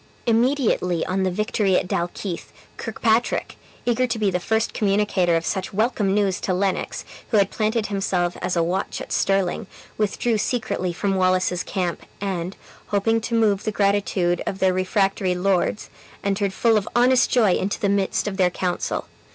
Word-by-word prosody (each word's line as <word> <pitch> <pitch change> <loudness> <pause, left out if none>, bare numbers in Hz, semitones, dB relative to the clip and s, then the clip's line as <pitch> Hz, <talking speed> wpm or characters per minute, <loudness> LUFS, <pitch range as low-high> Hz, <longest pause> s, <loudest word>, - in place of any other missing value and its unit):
Immediately 230 - +2
on 190 +1 -1
the 190 - +2
victory 195 0 +1
at - - -1
Dalkeith, 175 +1 -3 0.3
Kirkpatrick 225 +1 0 0.3
(eager 245 +1 +2
to 230 - -2
be 210 -3 +1
the 180 - 0
first 220 +4 0
communicator 195 -4 +2
of 165 0 0
such 190 -2 -2
welcome 210 -3 +1
news 200 -3 +1
to 185 - 0
Lennox, 190 0 -1 0.2
who 220 - +2
had 200 -1 +3
planted 220 0 0
himself 190 -3 -1
as 180 0 -1
a 170 - +2
watch 175 +3 -2
at - - -8
Stirling) 195 -1 +1 0.3
withdrew 215 +2 0
secretly 195 -5 -1
from 195 +3 -1
Wallace's 185 -1 +2
camp, 180 -3 -2 0.2
and, 190 -2 -3 0.3
hoping 225 +3 +1
to 230 +1 -2
move 210 -3 +2
the 215 - -1
gratitude 200 -4 +1
of 190 - -2
the 190 -1 +2
refractory 185 0 +1
lords, 190 +2 0 0.3
entered 200 -1 0
full 225 +3 +3
of 205 - -2
honest 250 +1 +4
joy 220 -7 +4
into 195 +3 -1
the 210 - +1
midst 200 +1 0
of 195 -2 -3
their 185 -2 +4
council. 180 0 -2
195 Hz, 170 wpm, -23 LUFS, 185-215 Hz, 0.3 s, honest